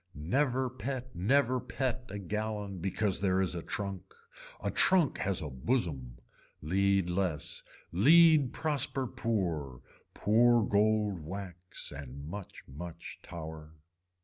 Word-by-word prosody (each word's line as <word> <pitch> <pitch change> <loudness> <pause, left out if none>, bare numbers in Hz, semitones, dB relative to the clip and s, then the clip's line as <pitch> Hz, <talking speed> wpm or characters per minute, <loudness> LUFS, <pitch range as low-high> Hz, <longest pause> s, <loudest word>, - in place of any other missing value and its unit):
Never 130 - +1
pet 130 0 -5
never 130 +7 +3
pet 130 0 -3
a 100 - -5
gallon 105 0 -3
because 95 +2 0
there 95 -1 +2
is 95 -1 +1
a 85 - -4
trunk. 100 +2 -5 0.4
A - - -2
trunk 180 -7 +3
has 95 -4 +1
a 75 - -4
bosom. 65 - -1 0.4
Lead 95 +3 +2
less. 90 -4 -1 0.3
Lead 155 - +6
prosper 140 -3 -1
pour, 85 - -2 0.4
poor 120 +2 +4
gold 105 -2 +2
wax 90 +2 -6
and 70 0 -8
much 100 +2 -8
much 85 +5 -8
tower. 80 -2 -8
100 Hz, 120 wpm, -31 LUFS, 85-120 Hz, 0.4 s, Lead